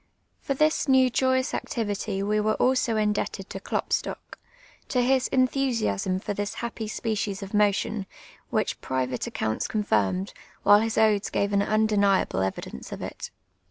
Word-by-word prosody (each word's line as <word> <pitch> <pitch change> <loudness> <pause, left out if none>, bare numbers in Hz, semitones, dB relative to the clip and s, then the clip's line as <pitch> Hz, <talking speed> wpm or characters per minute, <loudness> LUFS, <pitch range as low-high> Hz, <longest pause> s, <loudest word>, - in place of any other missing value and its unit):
For 275 - -2
this 305 +2 +2
new 260 -1 +5
joyous 260 +1 +1
acti\'ity 205 -3 -2
wo 210 +1 +1
wore 215 +1 +1
also 255 -3 +2
indeljted 210 -2 -1
to 195 - -6
Klopstock, - - -3 0.2
— - - -27
to 250 -2 +2
his 260 0 +2
entliusiaam 245 - 0
for - - -2
tliis 205 +1 -3
ha|)})y 235 -2 -4
s])ecies 210 -2 -2
of 195 - -9
mo 210 -1 +5
tion, 210 -1 -3 0.4
wliich - - -1
private 130 -1 -2
accounts 110 0 -2
confirmed, 185 - 0 0.3
while 205 0 +7
his 225 0 -1
odes 215 -2 +3
«:ave 200 0 +1
an 200 - +3
inideniable 205 - +2
evidence 95 -8 -5
of - - -6
it. - - -6
210 Hz, 155 wpm, -26 LUFS, 195-235 Hz, 0.4 s, while